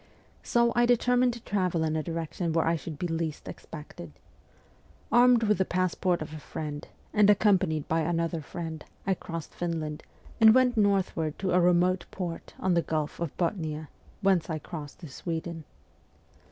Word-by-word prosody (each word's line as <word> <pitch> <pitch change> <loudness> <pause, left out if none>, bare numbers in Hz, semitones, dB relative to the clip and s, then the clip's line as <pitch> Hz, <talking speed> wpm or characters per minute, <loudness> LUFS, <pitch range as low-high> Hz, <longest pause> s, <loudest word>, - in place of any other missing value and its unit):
So 235 0 +2
I 240 0 +4
determined 245 +1 +3
to 235 - -10
travel 180 -5 0
in 155 0 0
a 155 - 0
direction 165 +1 -3
where 165 - +2
I 165 - +2
should 160 -1 -6
be 175 - -3
least 165 -2 -3
expected. 150 - -9 1.0
Armed 240 0 +6
with 210 -2 +2
the - - +4
passport 180 -1 0
of 155 - -10
a 155 - -6
friend, 150 -1 -6 0.3
and 210 -1 +5
accompanied 190 -7 +3
by 165 - +1
another 165 0 -1
friend, 160 0 -6 0.2
I 195 - +2
crossed 165 -3 -7
Finland, 160 -3 -3 0.4
and 220 0 +8
went 255 -1 +4
northward 195 -7 +1
to 190 -1 -1
a 180 - +4
remote 180 +1 +3
port 175 -3 -6
on 185 -1 +1
the 170 - +3
Gulf 155 -2 -3
of 170 -4 -4
Bothnia, 160 -4 -2 0.3
whence 190 -4 +2
I 160 - -1
crossed 150 0 -8
to 165 - -7
Sweden. 165 +2 -5
170 Hz, 165 wpm, -28 LUFS, 160-195 Hz, 1.0 s, and